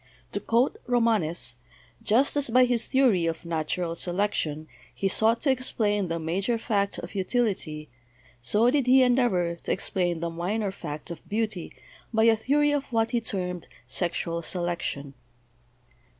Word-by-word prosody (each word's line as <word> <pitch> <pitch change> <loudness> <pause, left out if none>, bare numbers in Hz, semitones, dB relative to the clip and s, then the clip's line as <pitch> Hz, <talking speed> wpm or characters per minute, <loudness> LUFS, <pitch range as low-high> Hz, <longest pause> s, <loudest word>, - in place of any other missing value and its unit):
To - - -2
quote 235 +3 +1
Romanes: 215 - +1 0.4
"Just 255 +8 +3
as 285 -3 0
by 250 +2 +5
his 240 -2 +1
theory 245 -11 +3
of 165 +1 -4
natural 165 +1 -2
selection 170 -4 -2 0.2
he 195 - -1
sought 225 +4 +3
to 280 - +3
explain 210 -6 0
the 165 0 -2
major 190 +9 -1
fact 200 -3 -1
of 175 - -7
utility, 190 -7 -1 0.5
so 210 - +3
did 275 -3 +1
he 260 +1 +7
endeavor 225 -10 +2
to - - -4
explain 175 -3 0
the 170 0 -3
minor 195 +5 -2
fact 155 -3 -7
of 165 - -10
beauty 210 -4 -2 0.4
by 220 -1 +2
a 225 0 +6
theory 290 +6 +2
of 290 -1 0
what 225 -1 +1
he 240 -2 +1
termed 180 -5 -3 0.2
Sexual 170 -1 -2
Selection. 170 -5 -3
200 Hz, 150 wpm, -26 LUFS, 170-235 Hz, 0.5 s, he